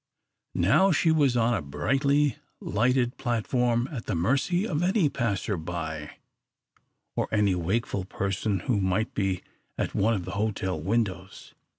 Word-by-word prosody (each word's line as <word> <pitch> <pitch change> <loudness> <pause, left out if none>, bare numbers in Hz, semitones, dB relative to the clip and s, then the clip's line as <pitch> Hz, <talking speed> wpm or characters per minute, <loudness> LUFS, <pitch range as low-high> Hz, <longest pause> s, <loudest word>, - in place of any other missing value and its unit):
Now 115 - +4
she 160 +1 +3
was 140 -6 +3
on 120 +1 +3
the 110 - 0
brightly 135 - +1 0.2
lighted 125 +4 +1
platform 120 0 0
at 120 -6 -6
the - - -1
mercy 135 - +1
of 155 -7 -1
any 180 -3 +3
passer 105 -6 -1
by, 80 -2 -5 1.0
or - - 0
any 105 -3 +3
wakeful 95 +2 -1
person 100 +1 -2
who 105 -6 0
might 95 +4 0
be 95 -3 -1 0.3
at - - -2
one 110 +3 +2
of 90 -4 -4
the 95 - -5
hotel 100 -4 -2
windows. 95 -1 -2
110 Hz, 145 wpm, -27 LUFS, 95-130 Hz, 1.0 s, Now